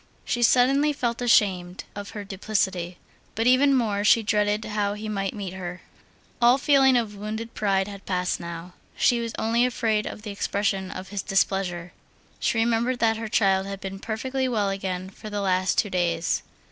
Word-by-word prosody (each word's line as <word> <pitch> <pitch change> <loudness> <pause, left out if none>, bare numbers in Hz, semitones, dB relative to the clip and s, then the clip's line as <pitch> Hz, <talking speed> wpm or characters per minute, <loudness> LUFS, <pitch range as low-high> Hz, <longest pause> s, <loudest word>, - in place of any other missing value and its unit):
She 240 - -1
suddenly 270 +5 +4
felt 240 -4 -2
ashamed 190 -6 +2
of 205 0 -6
her 205 - -4
duplicity, 190 -3 -2 0.4
but 225 - 0
even 270 +3 +5
more 210 -5 0
she 225 +2 +5
dreaded 210 0 +1
how 205 -1 -1
he 215 +1 -6
might 195 -2 -2
meet 195 -3 -5
her. 180 -1 -6 0.6
All 240 +2 +6
feeling 270 -2 +4
of 225 -3 -1
wounded 220 +3 -5
pride 195 -2 +1
had 200 -1 -10
passed 180 -1 -1
now; 170 +1 -7 0.2
she 240 -2 +3
was 230 -1 -4
only 230 +2 +2
afraid 225 -4 0
of 210 - -8
the 210 - -5
expression 200 -1 -1
of 185 0 -7
his 200 -1 -3
displeasure. 190 -3 -1 0.5
She 240 - 0
remembered 235 +2 +1
that 225 -2 +2
her 225 0 -4
child 195 -3 +2
had 195 0 -5
been 195 0 -6
perfectly 260 +5 -2
well 215 -5 0
again 190 -1 -4
for 215 - -10
the 205 0 -3
last 185 -1 +1
two 205 - +1
days. 170 -2 0
205 Hz, 180 wpm, -25 LUFS, 190-230 Hz, 0.6 s, All